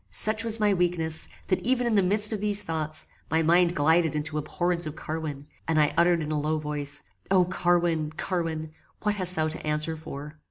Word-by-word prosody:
Such 215 - +4
was 225 -1 +4
my 210 -1 +3
weakness, 170 -3 +1 0.2
that 185 - 0
even 250 0 +1
in 235 - +1
the 205 - +4
midst 205 +4 +3
of 210 - -3
these 210 0 +3
thoughts, 155 -1 -2 0.2
my 160 0 +1
mind 170 +1 +3
glided 160 +1 +2
into 150 0 -2
abhorrence 175 +2 -2
of 155 - -6
Carwin, 155 -3 -5 0.2
and 160 -1 +2
I 150 -1 +2
uttered 170 -1 +3
in 150 - -4
a 150 - 0
low 155 +2 -1
voice, 150 -2 -3 0.3
O! 185 -2 +4
Carwin! 175 -3 0
Carwin! 165 -4 -3 0.3
What 210 -1 +2
hast 185 -3 0
thou 155 0 +1
to 160 - -5
answer 155 +1 -1
for? 150 -1 -9
165 Hz, 200 wpm, -26 LUFS, 155-185 Hz, 0.3 s, Such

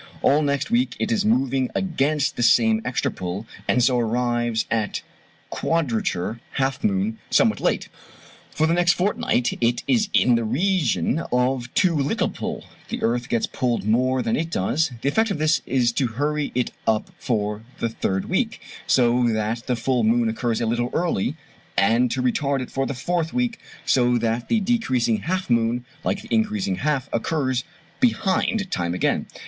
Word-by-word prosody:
All 145 +2 +4
next 140 - -1
week 245 +2 +1
it 230 - -1
is 220 -3 +2
moving 135 - +2
against 155 -5 0
the - - -3
same 110 -2 +4
extra 125 +1 -1
pull, 90 +4 -5 0.2
and 125 - +3
so 125 0 +3
arrives 120 0 0
at 110 -2 -1 0.5
quadrature 115 - -1
(half 135 0 -1
moon) 100 +3 0
somewhat - - +3
late. - - 0 0.6
For 155 - 0
the 165 - +2
next 175 +1 +4
fortnight 195 - 0
it 120 0 +1
is 225 -5 +2
in 125 - +4
the 115 0 +2
region 140 - +1
of 125 0 0
too 185 -3 +3
little 140 -1 0
pull, - - -5 0.2
the - - -4
earth 120 +2 0
gets 115 - +1
pulled 120 -5 -1
more 125 +4 +2
than 115 - 0
it 165 +1 -2
does; 150 - 0
the - - -2
effect 220 +8 +2
of 200 - -1
this 155 +1 +2
is 125 -2 +2
to 130 +2 0
hurry 150 +1 -1
it 125 -1 0 0.2
up 110 -1 +1
for 105 -4 -1 0.2
the 115 - -1
third 95 -3 -2
week, - - -1 0.3
so 120 -1 +3
that 110 +1 -1
the 125 - +1
full 120 +1 0
moon 115 +1 +3
occurs 115 0 -1
a 115 - 0
little 120 +2 0
early, 165 - 0 0.4
and 115 +6 +3
to 130 +1 -1
retard 140 +2 +1
it 125 - -7
for 135 0 -1
the 140 - -3
fourth 165 +5 -1
week, 245 -2 0 0.3
so 125 -1 +3
that 115 +1 -1
the 225 - +2
decreasing 130 - +1
half 185 - -2
moon 120 0 +1 0.2
like 200 - -1
the 225 - -6
increasing 210 -3 0
half 145 -5 -1
occurs 130 0 0 0.4
behind 210 -3 +1
time 85 -1 -1
again. - - 0
125 Hz, 175 wpm, -23 LUFS, 115-160 Hz, 0.6 s, All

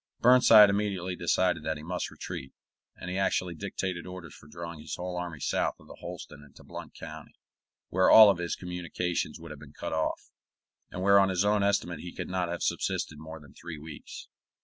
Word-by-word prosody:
Burnside 115 -4 +8
immediately 100 -3 -1
decided 90 -1 +1
that 80 -1 -2
he 75 - -10
must 90 +2 -3
retreat; 65 - -7 0.4
and 90 - -9
he 95 - -1
actually 90 -2 0
dictated 95 0 -4
orders 90 -4 -9
for - - -15
drawing 85 +1 -8
his 75 - -6
whole 90 0 -5
army 90 -4 -5
south - - 0
of - - -17
the - - -12
Holston 75 - -9
into 70 - -17
Blount - - -9
County, - - -10 0.5
where 95 +1 +3
all 105 -3 +9
his 85 0 -3
communications 90 -1 -3
would 80 -1 -10
have 75 - -9
been 75 0 -13
cut - - -5
off, 80 0 -2 0.6
and 90 - -5
where 100 +1 +7
on 95 -1 +4
his 95 +1 +1
own 105 0 +3
estimate 100 -5 0
he 90 - -8
could - - -5
not 90 -1 -1
have 85 0 -3
subsisted 75 - -1
more 80 +1 -9
than 70 -3 -16
three 80 -2 -8
weeks. 75 0 -10
90 Hz, 195 wpm, -29 LUFS, 80-95 Hz, 0.6 s, all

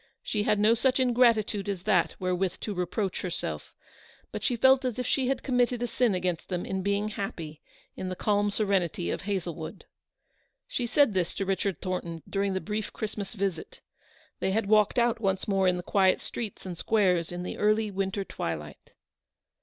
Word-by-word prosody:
She 210 - -1
had 210 0 +2
no 210 +2 +5
such 255 +3 +2
ingratitude 230 -5 +3
as 190 -3 -3
that 190 -5 +2
wherewith 185 0 0
to 210 - -3
reproach 185 +2 -2
herself; 180 -2 -4 0.6
but - - -5
she 250 - +1
felt 265 +3 +5
as 250 -3 -2
if 250 - -2
she 265 -2 +1
had 265 -1 -1
committed 245 -2 +1
a - - +2
sin 240 -4 +1
against 180 -2 -2
them 180 -2 -2
in 190 0 -2
being 200 +2 0
happy 165 -7 -5 0.3
in 185 - -4
the 185 - -3
calm 205 +1 +1
serenity 195 - 0
of - - -3
Hazlewood. 175 -5 -4 0.8
She 245 - -2
said 280 -2 +4
this 180 -3 0
to 195 - -2
Richard 195 0 -1
Thornton 170 -3 -3
during 195 -1 0
the - - +1
brief 215 0 -3
Christmas 210 -2 -5
visit. 195 -5 -3 0.6
They 190 - 0
had 220 0 +1
walked 210 +1 +4
out 235 -1 +3
once 190 -2 0
more 195 -2 +2
in 180 -1 +3
the 180 - -5
quiet 190 0 +3
streets 220 -5 -6
and 180 -2 -5
squares 180 -7 +2
in 175 0 -4
the - - -5
early 215 0 +2
winter 195 +1 -1
twilight. 75 - -6
200 Hz, 185 wpm, -28 LUFS, 185-220 Hz, 0.8 s, no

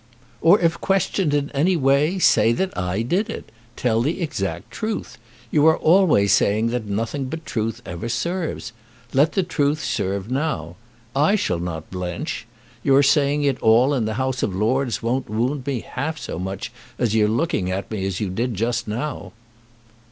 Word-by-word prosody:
"Or 170 +5 +6
if 165 -1 +1
questioned 195 -3 +1
in 145 -1 0
any 170 +6 +2
way, 140 +5 +2
say 115 -9 +4
that 190 +9 -2
I 90 +4 -1
did 190 - 0
it. 225 - -7 0.2
Tell 115 -2 +1
the 155 +9 -1
exact 115 - -3
truth. 215 - -4 0.3
You 150 +1 +4
are 160 - +5
always 155 - +4
saying 105 +3 +2
that 120 -2 -3
nothing 115 +7 -2
but 160 +5 -6
truth 110 -1 -3
ever 85 +7 -5
serves. 165 -2 -3 0.4
Let 145 +4 +3
the 195 - +2
truth 150 -3 0
serve 100 +4 -2
now. 130 - -2 0.4
I 150 +9 +4
shall 90 - 0
not 85 -2 -5
blench. 95 - -4 0.3
Your 140 +3 +4
saying 140 +1 +3
it 140 -3 0
all 120 +5 +5
in 125 -5 0
the 110 0 -2
House 130 0 -1
of 95 - -1
Lords 120 +4 0
won't 125 +1 -1
wound 125 +5 -1
me 130 -5 -1
half 155 +4 -4
so 85 - -5
much 95 +1 -4 0.3
as 115 -4 0
your 110 -1 +4
looking 110 - 0
at 95 +3 -3
me 105 -3 -3
as 95 -2 -3
you 100 -4 -2
did 115 +4 -2
just 115 +4 -1
now." 125 +7 -4
125 Hz, 175 wpm, -22 LUFS, 105-150 Hz, 0.4 s, Or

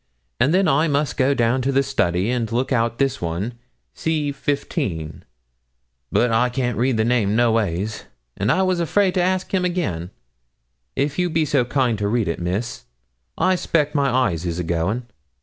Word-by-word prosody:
And 140 - +3
then 190 +2 +3
I 155 +2 +3
must 145 0 0
go 135 +1 +2
down 120 +2 +2
to 135 +2 0
the 135 0 +3
study, 100 -6 0
and 115 -3 -1
look 125 +4 -1
out 115 -2 +1
this 135 -1 0
one, 85 +8 -2 0.4
"C, 155 -3 -1
15;" 135 - -3 0.9
but 120 0 +2
I 120 +3 +3
can't 125 -1 -1
read 125 -1 +2
the 110 - +2
name, 115 -4 +2
noways; 110 -3 0 0.3
and 100 +3 +1
I 190 - +2
was 185 -2 +1
afraid 185 +3 +2
to 185 - +1
ask 185 +1 0
him 185 -1 +2
again; 155 - -2 0.9
if 140 +4 -1
you 180 0 +2
be 160 -1 +1
so 135 -4 +2
kind 125 -4 0
to 100 - 0
read 110 -2 +1
it, 85 - -2
Miss 95 - -3 0.5
I 185 - +3
suspeck 150 -4 0
my 140 -2 +2
eyes 125 -10 +1
is 85 -2 -3
a 90 - -2
going.' 85 +9 -1
125 Hz, 185 wpm, -22 LUFS, 105-150 Hz, 0.9 s, And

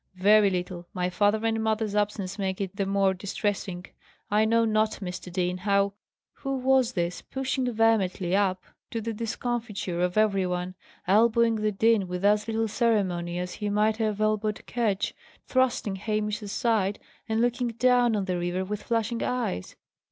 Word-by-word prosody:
"Very 205 +2 +5
little. 180 -1 -4
My 180 0 -1
father 205 +5 +2
and 225 0 +1
mother's 220 -1 0
absence 205 -1 -1
makes 190 -1 -2
it 195 -1 -4
the 195 -1 -1
more 195 -1 +2
distressing. 190 -1 -3 0.5
I 210 +1 +4
know 230 +1 +3
not, 215 0 +2
Mr. 180 -2 -6
Dean, 180 0 -1
how 200 +1 +2 0.2
" - - -67
Who 270 -1 -2
was 260 -1 +3
this, 175 -2 -2
pushing 265 -1 -2
vehemently 205 -5 +2
up, 190 -2 +1 0.3
to 230 - -3
the 225 +1 -3
discomfiture 225 -5 -3
of 180 +2 0
every 200 -3 +3
one, 180 0 -3 0.3
elbowing 230 +3 +4
the 215 0 0
dean 215 -1 +2
with 180 +2 -3
as 210 +1 +3
little 225 0 0
ceremony 190 -7 0
as 180 0 -3
he 210 - 0
might 210 +1 +2
have 215 -2 -1
elbowed 215 0 0
Ketch, 215 -4 -1 0.3
thrusting 250 -6 +1
Hamish 210 +1 -2
aside, 205 -1 0 0.3
and 220 0 +1
looking 245 +1 +1
down 245 0 +3
on 200 -2 -1
the 180 -2 -1
river 175 +2 -2
with 210 +2 -4
flashing 230 0 -1
eyes? 230 - -2
210 Hz, 165 wpm, -27 LUFS, 190-225 Hz, 0.5 s, Very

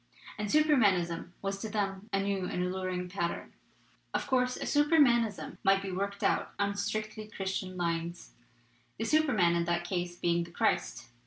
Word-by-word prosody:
And 210 -1 -2
Supermanism 200 - +3
was 195 0 -2
to 220 - -4
them 200 -1 -2
a 195 - +1
new 195 -1 -1
and 180 - -2
alluring 180 0 -2
pattern. 175 -2 -3 0.6
"Of - - 0
course 255 -1 +1
a - - -9
Supermanism 280 -8 +3
might 195 0 +4
be 195 - -4
worked 200 +2 -3
out - - +1
on 200 0 +1
strictly 215 +1 -3
Christian 190 -2 -4
lines, 170 0 -2 0.7
the 225 - -2
Superman 225 - +3
in 170 0 +1
that 170 0 0
case 175 -1 -2
being 170 0 +1
the 170 - -10
Christ. 120 -7 -1
195 Hz, 160 wpm, -31 LUFS, 175-215 Hz, 0.7 s, might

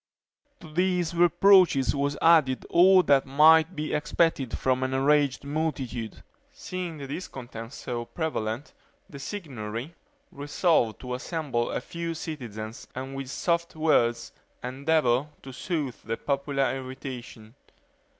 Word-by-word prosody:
To 160 -3 -12
these 180 -1 +1
reproaches 175 - +5
was 140 +1 -1
added 155 -6 +4
all 185 +2 +6
that 140 -4 +3
might 155 +3 +5
be 155 0 -3
expected 150 -3 0
from 130 0 +1
an 130 0 -1
enraged 140 0 +2
multitude. 140 -7 -3 0.3
Seeing 180 -3 -6
the 140 - -7
discontent 125 -6 -7
so 120 -3 -5
prevalent, 130 -4 -4 0.3
the 140 - -10
Signory 135 - -6 0.4
resolved 145 - +1
to 125 -1 -5
assemble 130 -3 -2
a - - -2
few 170 +4 -5
citizens, 115 -9 -7
and 130 +1 -6
with 135 -1 -5
soft 170 +3 -1
words 135 -7 +1 0.3
endeavor 135 0 +1 0.2
to 135 - -9
soothe 145 - -3
the 115 +1 -4
popular 140 0 -1
irritation. 130 -4 -8
140 Hz, 120 wpm, -27 LUFS, 125-160 Hz, 0.4 s, all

